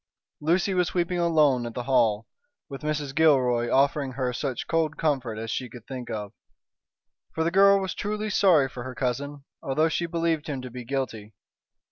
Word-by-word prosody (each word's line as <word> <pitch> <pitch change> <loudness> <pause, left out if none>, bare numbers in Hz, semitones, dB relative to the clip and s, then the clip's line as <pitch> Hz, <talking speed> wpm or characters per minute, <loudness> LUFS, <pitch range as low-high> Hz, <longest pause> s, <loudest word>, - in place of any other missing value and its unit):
Lucy 175 +5 +1
was 180 -1 0
weeping 175 0 0
alone 155 -7 +3
at 115 - -8
the 125 - -3
Hall, 115 -5 +2 0.4
with 135 -1 -8
Mrs. 150 -2 -2
Gilroy 130 -6 +3
offering 140 0 +2
her 125 -1 -2
such 130 0 -3
cold 160 -2 0
comfort 135 -8 -1
as 110 0 -4
she 125 +1 -3
could 120 -1 -12
think 125 -2 -7
of. 105 -1 -5 1.0
For 160 - +1
the 165 - 0
girl 200 +1 +6
was 190 -1 -3
truly 210 +1 -3
sorry 175 -10 +4
for 125 -2 -8
her 130 0 -7
cousin, 140 +3 -3 0.2
although 155 +4 +1
she 170 +2 -1
believed 165 -2 -1
him 140 -3 -3
to 125 - -7
be 125 0 -8
guilty. 115 -6 -4
140 Hz, 180 wpm, -26 LUFS, 125-165 Hz, 1.0 s, girl